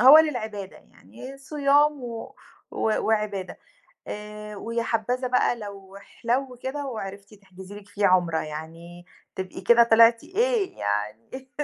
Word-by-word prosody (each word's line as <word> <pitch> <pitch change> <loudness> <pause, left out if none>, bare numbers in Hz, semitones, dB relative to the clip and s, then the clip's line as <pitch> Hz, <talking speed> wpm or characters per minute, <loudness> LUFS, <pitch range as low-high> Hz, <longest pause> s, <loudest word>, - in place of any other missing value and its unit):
هو 270 +5 +10
للعبادة 220 -10 -1
يعني، 270 +2 -13
صيام 290 +1 +2
و 230 -2 -7 0.4
و - - -6 0.3
وعبادة، 210 -4 -1 0.5
آآ 210 0 -7
ويا 230 +3 -2
حبّذا 245 +3 -1
بقى 250 -1 +2
لو 200 -3 -10
احلو 245 +5 -3
كده 280 +2 -3
وعرفتِ 200 -4 -7
تحجزي 190 -1 -13
لِك 205 -1 -13
فيه 205 0 +1
عُمرة 175 -3 +3
يعني 165 +3 -8 0.3
تبقي 185 -1 -5
كده 235 +5 +6
طلعتي 230 0 +5
إيه 470 -4 +1
يعني 105 - -3
215 Hz, 130 wpm, -25 LUFS, 190-255 Hz, 0.5 s, هو